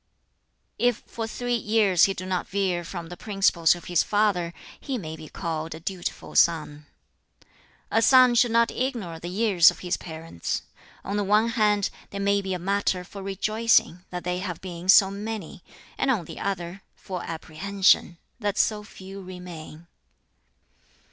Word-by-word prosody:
"If 245 Hz, -1 st, +1 dB
for 225 Hz, -1 st, -5 dB
three 245 Hz, +2 st, -3 dB
years 210 Hz, -5 st, +3 dB
he 195 Hz, -, -1 dB
do 185 Hz, -, -6 dB
not 185 Hz, -1 st, -2 dB
veer 190 Hz, -3 st, -1 dB
from 170 Hz, -1 st, -7 dB
the 175 Hz, -, -7 dB
principles 195 Hz, -5 st, +2 dB
of 175 Hz, -, -11 dB
his 175 Hz, -2 st, +2 dB
father, 205 Hz, -5 st, +1 dB, 0.3 s
he 270 Hz, -3 st, -3 dB
may 160 Hz, -7 st, -6 dB
be 155 Hz, -1 st, -11 dB
called 160 Hz, -2 st, -4 dB
a -, -, -9 dB
dutiful 180 Hz, +1 st, -5 dB
son. 150 Hz, -3 st, +2 dB, 1.0 s
"A 225 Hz, -, +3 dB
son 255 Hz, 0 st, +7 dB
should 240 Hz, 0 st, +4 dB
not 230 Hz, 0 st, +3 dB
ignore 230 Hz, -11 st, -3 dB
the 175 Hz, -, -6 dB
years 190 Hz, -3 st, +5 dB
of -, -, -7 dB
his 180 Hz, -1 st, -1 dB
parents. 160 Hz, -, -5 dB, 0.4 s
On 200 Hz, +2 st, -3 dB
the 205 Hz, -, +1 dB
one 210 Hz, +3 st, +3 dB
hand, 210 Hz, -3 st, +2 dB, 0.2 s
they 200 Hz, -, -7 dB
may 200 Hz, 0 st, +2 dB
be 190 Hz, -1 st, -3 dB
a -, -, -2 dB
matter 190 Hz, 0 st, 0 dB
for 195 Hz, +2 st, -10 dB
rejoicing 195 Hz, -2 st, +1 dB
(that 180 Hz, -1 st, -5 dB
they 180 Hz, 0 st, -2 dB
have 180 Hz, -3 st, -4 dB
been 180 Hz, -1 st, -8 dB
so 195 Hz, 0 st, +7 dB
many), 205 Hz, -3 st, -6 dB, 0.4 s
and -, -, +1 dB
on 215 Hz, -10 st, +1 dB
the -, -, -9 dB
other, 185 Hz, -1 st, -4 dB
for 185 Hz, -2 st, -6 dB
apprehension 175 Hz, +2 st, +1 dB, 0.2 s
(that 205 Hz, -2 st, -2 dB
so 210 Hz, -1 st, +1 dB
few 195 Hz, -1 st, -10 dB
remain). 175 Hz, -3 st, -10 dB
190 Hz, 165 wpm, -25 LUFS, 175-210 Hz, 1.0 s, son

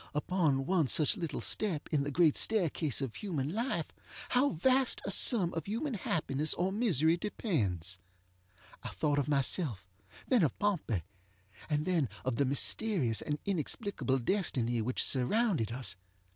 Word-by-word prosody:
Upon 150 Hz, -4 st, 0 dB
one 170 Hz, -3 st, +1 dB
such 150 Hz, -, +4 dB
little 170 Hz, -6 st, -4 dB
step 180 Hz, -9 st, -1 dB
in 145 Hz, -, +2 dB
the 140 Hz, -, -3 dB
great 160 Hz, +1 st, +3 dB
staircase 165 Hz, -, +2 dB
of 130 Hz, -5 st, -4 dB
human 155 Hz, -, -4 dB
life 235 Hz, +5 st, -3 dB, 0.4 s
how 260 Hz, +3 st, +2 dB
vast 260 Hz, -, +1 dB
a 195 Hz, -, -1 dB
sum 195 Hz, -3 st, +5 dB
of 165 Hz, +1 st, -5 dB
human 245 Hz, +7 st, -3 dB
happiness 155 Hz, -6 st, -1 dB
or 185 Hz, +2 st, -1 dB
misery 175 Hz, -, +2 dB
depends! 100 Hz, -, -2 dB, 0.8 s
I -, -, -6 dB
thought 145 Hz, -2 st, -1 dB
of 140 Hz, -, -2 dB
myself, 135 Hz, -, -1 dB, 0.4 s
then 250 Hz, -5 st, +3 dB
of 155 Hz, -, 0 dB
Pompey, 170 Hz, -, -1 dB, 0.7 s
and 150 Hz, 0 st, 0 dB
then 165 Hz, -9 st, 0 dB, 0.2 s
of 130 Hz, -3 st, -1 dB
the 140 Hz, -, +2 dB
mysterious 140 Hz, -, 0 dB
and 150 Hz, -, -3 dB
inexplicable 195 Hz, -, -2 dB
destiny 120 Hz, -, 0 dB
which 125 Hz, +3 st, 0 dB
surrounded 145 Hz, -, +1 dB
us. 125 Hz, -2 st, -1 dB
155 Hz, 145 wpm, -31 LUFS, 135-200 Hz, 0.8 s, sum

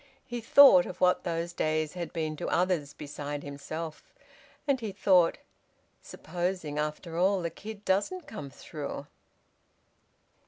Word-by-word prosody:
He 240 Hz, -1 st, -5 dB
thought 225 Hz, -6 st, +8 dB
of 180 Hz, -, -8 dB
what 180 Hz, 0 st, +3 dB
those 170 Hz, 0 st, -2 dB
days 155 Hz, -2 st, 0 dB
had 175 Hz, -2 st, -5 dB
been 155 Hz, -2 st, -2 dB
to -, -, -4 dB
others 175 Hz, -5 st, +1 dB
beside 145 Hz, 0 st, -6 dB
himself. 155 Hz, +3 st, -7 dB, 0.5 s
And 275 Hz, -2 st, +2 dB
he 220 Hz, -4 st, -4 dB
thought: 185 Hz, -3 st, +4 dB, 0.6 s
"Supposing 175 Hz, -3 st, -3 dB
after 150 Hz, +2 st, -3 dB
all 190 Hz, 0 st, +3 dB
the 170 Hz, -, -2 dB
kid 210 Hz, +3 st, -9 dB
doesn't 210 Hz, -, 0 dB
come 145 Hz, -10 st, -7 dB
through?" 145 Hz, 0 st, -7 dB
170 Hz, 130 wpm, -29 LUFS, 150-190 Hz, 0.6 s, thought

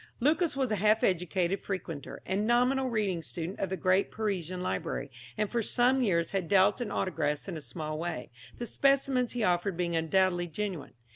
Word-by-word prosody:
Lucas 305 Hz, +4 st, +2 dB
was 260 Hz, -4 st, 0 dB
a 215 Hz, -, +1 dB
half 215 Hz, +3 st, +3 dB
educated 180 Hz, +1 st, +1 dB
frequenter, 165 Hz, -6 st, -5 dB
and 200 Hz, +3 st, 0 dB
nominal 255 Hz, +2 st, +3 dB
reading 205 Hz, -7 st, 0 dB
student 170 Hz, +3 st, -5 dB
of 195 Hz, -, -1 dB
the 190 Hz, -, -2 dB
great 185 Hz, +1 st, +2 dB
Parisian 185 Hz, -5 st, -2 dB
library, -, -, -3 dB, 0.3 s
and 210 Hz, -1 st, -1 dB
for 235 Hz, -, +1 dB
some 250 Hz, +4 st, +2 dB
years 170 Hz, -8 st, +1 dB
had 190 Hz, -4 st, -1 dB
dealt 200 Hz, +4 st, +4 dB
in 235 Hz, -, -2 dB
autographs 150 Hz, -6 st, -1 dB
in 190 Hz, -, -4 dB
a 155 Hz, -, -5 dB
small 155 Hz, +3 st, -5 dB
way, 170 Hz, -7 st, -4 dB, 0.3 s
the 240 Hz, -, -4 dB
specimens 270 Hz, 0 st, +2 dB
he 240 Hz, -2 st, -1 dB
offered 180 Hz, -1 st, +1 dB
being 170 Hz, -1 st, -1 dB
undoubtedly 175 Hz, +2 st, +2 dB
genuine. 175 Hz, -5 st, -5 dB
190 Hz, 185 wpm, -30 LUFS, 175-230 Hz, 0.3 s, dealt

